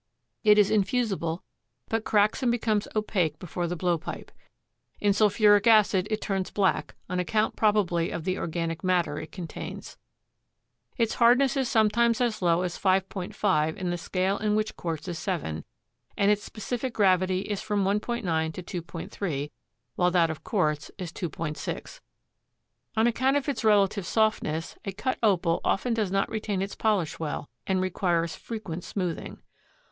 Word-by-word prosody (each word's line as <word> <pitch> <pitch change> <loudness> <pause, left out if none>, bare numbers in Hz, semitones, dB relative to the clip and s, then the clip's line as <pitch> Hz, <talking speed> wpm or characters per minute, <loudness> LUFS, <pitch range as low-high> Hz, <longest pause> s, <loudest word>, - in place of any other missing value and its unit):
It 210 -1 +6
is 205 0 +5
infusible, 200 -6 0 0.4
but 225 0 -1
cracks 210 +2 +2
and 245 -2 +2
becomes 220 -3 0
opaque 180 -8 0
before 175 +1 -3
the 175 - -2
blowpipe. 175 -2 -2 0.7
In 205 -1 +3
sulphuric 205 0 +4
acid 210 -4 +5
it 215 0 -1
turns 195 -2 -1
black, 195 -2 0
on 180 0 -2
account 215 +5 0
probably 195 -6 +2
of 165 - -4
the 185 +2 -1
organic 165 0 -3
matter 180 -5 +1
it 155 - -8
contains. 175 -4 -7 1.0
Its 230 -3 +1
hardness 250 +3 +4
is 265 -3 0
sometimes 230 +1 +3
as 240 -4 0
low 175 0 +3
as 175 -1 -3
5.5 185 -4 +1
in 185 -2 -2
the 175 - -1
scale 190 +3 -1
in 210 0 +1
which 215 0 -1
quartz 165 -1 -4
is 170 -2 -4
7 155 - -3 0.5
and 200 0 +4
its 210 0 +1
specific 245 +3 -4
gravity 185 -2 +3
is 205 0 -3
from 210 -2 0
1.9 190 -6 0
to 180 -1 -5
2.3, 165 -3 -4 0.5
while 180 0 +4
that 170 -2 +3
of 155 - -8
quartz 150 -8 0
is 180 -4 -5
2.6. 160 -3 -5 1.0
On 220 - +4
account 260 +4 +2
of 285 - -3
its 280 -4 -2
relative 200 -3 +3
softness 215 -8 0
a 195 - -4
cut 235 +7 -2
Opal 185 -6 +2
often 235 +4 +1
does 215 -4 0
not 195 +1 +1
retain 210 -3 -2
its 200 - -5
polish 205 -8 0
well 150 -2 -4 0.2
and 190 -1 +1
requires 170 -3 0
frequent 185 -7 -6
smoothing. 180 -5 -4
195 Hz, 155 wpm, -27 LUFS, 170-215 Hz, 1.0 s, It